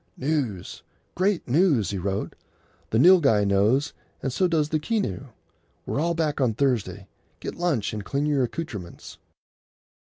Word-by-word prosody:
"News! 130 - -2 0.3
great 190 0 0
news!" 140 - +2
he 100 - -3
wrote. 95 +2 -3 0.5
"The 110 - +1
Nilghai 135 - +5
knows, 105 +8 +2 0.3
and 135 - -2
so 185 +8 +2
does 155 -3 +1
the 155 - 0
Keneu. 195 - -2 0.6
We're - - -2
all 170 +2 0
back 155 -3 -1
on 120 -4 +1
Thursday. 105 -8 -1 0.3
Get - - -5
lunch 165 - -1
and 105 -1 -4
clean 140 +7 -1
your 145 -2 +1
accoutrements." 115 - -6
135 Hz, 140 wpm, -25 LUFS, 105-160 Hz, 0.6 s, Nilghai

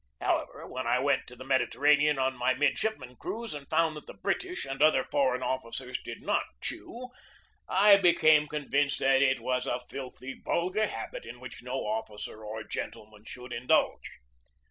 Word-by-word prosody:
However, - - -1
when 130 -1 -5
I 120 - +3
went 140 +1 +1
to 125 - -11
the 130 - -10
Mediterranean 145 +2 +3
on 130 0 +1
my 125 +1 +1
midshipman 135 - -1
cruise 230 -3 -5
and 145 -2 -8
found 165 -1 +2
that 150 - -10
the - - -10
British 370 -1 -2
and 135 +1 -5
other 155 +1 +5
foreign 130 -3 +1
officers 130 0 -3
did - - -8
not - - +1 0.2
chew, 250 - -5 0.6
I 200 +2 +7
became 155 -5 +5
convinced 145 -1 0
that 135 0 +4
it 130 -2 +3
was 125 +2 -1
a 120 - 0
filthy, 130 +1 -8
vulgar 185 +5 +1
habit - - -6
in - - -9
which - - -9
no - - -3
officer 110 - -4
or 110 +1 -5
gentleman 105 0 -7
should 125 +1 -8
indulge. 120 +2 +1
135 Hz, 165 wpm, -29 LUFS, 125-155 Hz, 0.6 s, I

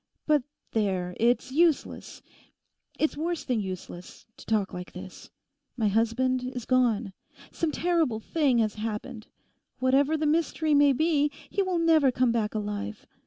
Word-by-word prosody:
But 300 -2 +3 0.3
there, 185 -5 -1
it's 240 +2 +2
useless, 320 +1 0 0.7
it's 310 - 0
worse 335 +2 -2
than 250 -4 0
useless, 185 -2 -8
to - - -14
talk 215 -3 0
like 180 0 -7
this. 185 0 -10 0.5
My 220 -3 +2
husband 235 +4 +1
is 250 -2 -5
gone. 235 -5 +1 0.4
Some 330 -2 -1
terrible 325 -10 +1
thing 275 +1 +1
has 215 -2 +1
happened. 220 +1 -5 0.5
Whatever 275 +4 +2
the 310 - -1
mystery 315 0 +1
may 285 -1 +6
be, 295 +1 +2 0.2
he 400 - +1
will 375 -2 0
never 320 -5 +4
come 250 -1 +2
back 220 -2 -1
alive. 205 - -4
255 Hz, 145 wpm, -27 LUFS, 215-305 Hz, 0.7 s, may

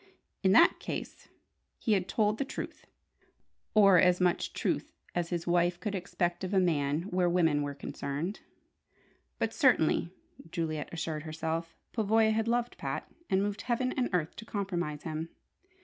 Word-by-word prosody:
In 190 - +4
that 335 - +6
case - - -6 0.5
he 220 - +1
had 190 -2 +1
told 215 +1 +1
the - - +2
truth 270 - -7 0.9
or 195 -4 +7
as 180 0 +4
much 180 -1 +1
truth - - -2 0.2
as 175 -1 -1
his 175 -1 -2
wife 175 0 +2
could 210 - -3
expect 175 -1 -2
of 190 +2 -2
a - - +6
man 155 -3 +1
where 180 -2 +1
women 165 -4 +3
were 145 -1 -3
concerned. 145 +7 -4 1.0
But - - -1
certainly, 245 - +3 0.4
Juliet 160 -2 -3
assured 160 -2 -3
herself, 160 +1 -4 0.2
Pavoya 220 0 +3
had 220 +1 0
loved 240 +1 0
Pat - - -4 0.2
and 190 +1 +3
moved 205 0 -2
heaven 255 +1 0
and 250 -1 0
earth 170 -4 -1
to - - -7
compromise 175 -8 -3
him. 160 0 -4
180 Hz, 155 wpm, -30 LUFS, 165-210 Hz, 1.0 s, or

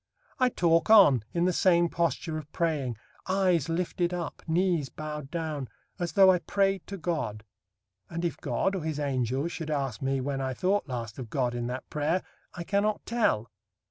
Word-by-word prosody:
I 255 -1 +4
talk 170 -4 +2
on, 145 - +7
in 170 0 +1
the 185 - +2
same 175 -1 +4
posture 165 -1 -1
of 150 -1 -12
praying; 145 -9 -1 0.3
eyes 185 -5 +2
lifted 175 +1 -1
up; 170 -2 -5
knees 170 -4 +1
bowed 150 -2 -6
down; 155 -5 -3 0.3
as 175 -1 -2
though 190 -2 +7
I 180 - +2
prayed 195 0 0
to 200 - -6
God; 140 - -3 0.7
and, 170 +1 -3
if 170 - -2
God, 140 +8 -1
or 190 - -2
his 155 -2 -2
Angels 135 +2 -1
should 160 -3 -5
ask 135 -7 -2
me, 135 0 0
when 135 +1 -2
I 130 -1 -2
thought 195 +4 +1
last 115 -3 -5
of 120 -4 -6
God 125 -1 0
in 120 0 -3
that 125 +1 -5
prayer, 155 +5 0 0.3
I 175 - -5
cannot 205 +3 0
tell. 115 - +1
160 Hz, 180 wpm, -28 LUFS, 135-180 Hz, 0.7 s, on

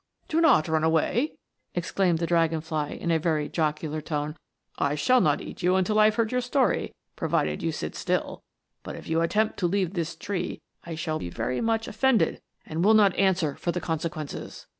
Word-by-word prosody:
" - - -43
Do 330 -2 +1
not 265 - +5
run 160 -1 +1
away!" 165 - +1 0.4
exclaimed 175 0 +1
the 170 - -1
dragon 165 -1 +2
fly, 155 -2 -2
in 170 - -3
a 165 - +3
very 155 -2 0
jocular 155 -1 -1
tone. 150 -1 -3 0.2
" - - -38
I 145 - -1
shall 250 +12 +4
not - - +2
eat - - -8
you 180 +1 +3
until 190 +3 +2
I 215 - +7
have 215 0 +3
heard 225 -1 +1
your 250 0 +1
story, 255 +2 0 0.2
provided - - 0
you - - 0
sit - - -5
still - - -1
j - - -32 0.4
but - - -7
if - - -10
you 165 +1 +1
attempt 215 +6 +1
to 180 - +2
leave 190 -1 0
this 170 -2 -3
tree, 185 -3 -4 0.2
I 165 -1 -6
shall 155 -1 -2
be 85 - -5
very 115 +7 -2
much 225 -1 0
offended, 230 -5 +2 0.2
and 160 +2 -2
will 220 +3 +6
not 205 -3 +5
answer 185 -6 +2
for 175 - -2
the 180 - -2
consequences." 160 -2 -5
170 Hz, 210 wpm, -26 LUFS, 160-210 Hz, 0.4 s, I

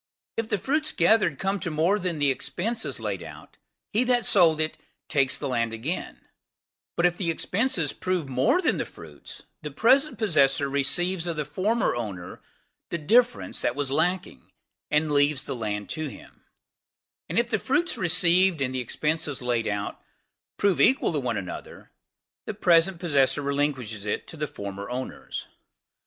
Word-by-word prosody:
If 225 -1 -2
the - - +1
fruits 305 - 0
gathered 175 -4 +3
come 195 +4 -1
to 175 -1 -3
more 165 +7 +2
than 180 -3 -2
the 145 -2 +3
expenses 220 - -3
laid - - -3
out, - - -12 0.4
he 225 +4 +3
that 245 -2 +2
sold 165 -5 +5
it 155 0 0 0.3
takes 135 -2 +2
the 145 - -4
land 115 -3 -1
again; 135 +11 -4 0.7
but 170 - +2
if 175 0 +2
the 175 -4 -1
expenses 180 - 0
prove 185 -5 -2
more 135 - +2
than - - +2
the - - -2
fruits, - - -12 0.2
the 150 - -5
present 265 - +3
possessor 145 - +3
receives 170 +6 +1
of 170 - -2
the 150 - -1
former 195 +11 0
owner 100 -7 -6 0.5
the 170 - -2
difference 240 +10 +2
that 120 - 0
was 140 -2 -2
wanting, 180 +5 -1 0.4
and 150 +1 +1
leaves 145 -1 +2
the - - -4
land 105 -3 -3
to 155 -1 -3
him; - - -13 0.8
and - - -3
if 235 +1 +1
the 220 - +1
fruits 335 - +1
received, 180 0 +3
and 130 -1 -1
the 130 - -1
expenses 150 +2 -1
laid 120 -2 0
out, 100 0 -3 0.6
prove 200 -2 +2
equal 265 - +4
to - - 0
one - - -2
another, - - -8 0.6
the 215 - -4
present 175 -2 +3
possessor 145 -4 +2
relinquishes 135 -7 -2
it 105 - -2
to - - -9
the 150 -1 -3
former 100 -2 -7
owners. 130 +1 -5
160 Hz, 165 wpm, -26 LUFS, 135-190 Hz, 0.8 s, sold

